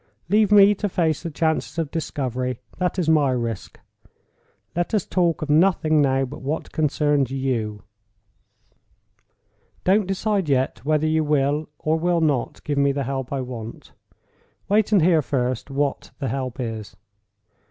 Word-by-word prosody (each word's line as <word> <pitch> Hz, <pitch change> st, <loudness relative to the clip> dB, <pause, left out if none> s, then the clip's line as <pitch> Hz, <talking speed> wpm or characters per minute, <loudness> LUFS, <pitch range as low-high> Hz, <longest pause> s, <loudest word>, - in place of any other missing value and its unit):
Leave 210 Hz, +1 st, +3 dB
me 205 Hz, 0 st, +7 dB
to 205 Hz, +1 st, -3 dB
face 160 Hz, -5 st, 0 dB
the 170 Hz, -, -4 dB
chances 160 Hz, +1 st, -1 dB
of 160 Hz, -4 st, -2 dB
discovery—that 135 Hz, +3 st, -3 dB
is 175 Hz, -4 st, 0 dB
my 155 Hz, -3 st, +4 dB
risk. 120 Hz, -4 st, -3 dB, 1.0 s
Let 175 Hz, +5 st, 0 dB
us 205 Hz, -, 0 dB
talk 170 Hz, -4 st, 0 dB
of 155 Hz, -, -6 dB
nothing 155 Hz, -2 st, +3 dB
now 135 Hz, -1 st, +2 dB
but 135 Hz, +3 st, -9 dB
what 145 Hz, +4 st, -3 dB
concerns 145 Hz, -3 st, +1 dB
you. 120 Hz, -6 st, -2 dB, 2.0 s
Don't 195 Hz, +1 st, +3 dB
decide 195 Hz, -2 st, -1 dB
yet 130 Hz, -3 st, 0 dB
whether 155 Hz, +1 st, +1 dB
you 155 Hz, 0 st, +2 dB
will, 150 Hz, 0 st, +1 dB
or 155 Hz, +2 st, 0 dB
will 175 Hz, +1 st, +1 dB
not, 145 Hz, -6 st, -1 dB
give 145 Hz, -1 st, -1 dB
me 140 Hz, 0 st, +3 dB
the 140 Hz, 0 st, -2 dB
help 135 Hz, 0 st, -4 dB
I 135 Hz, -1 st, -1 dB
want. 120 Hz, -3 st, -8 dB, 0.8 s
Wait, 210 Hz, +1 st, +2 dB
and 200 Hz, -6 st, +5 dB
hear 165 Hz, -2 st, +4 dB
first 130 Hz, -2 st, -2 dB
what 140 Hz, 0 st, -2 dB
the 135 Hz, -, -3 dB
help 130 Hz, -1 st, -4 dB
is. 110 Hz, -4 st, -5 dB
150 Hz, 150 wpm, -23 LUFS, 130-170 Hz, 2.0 s, me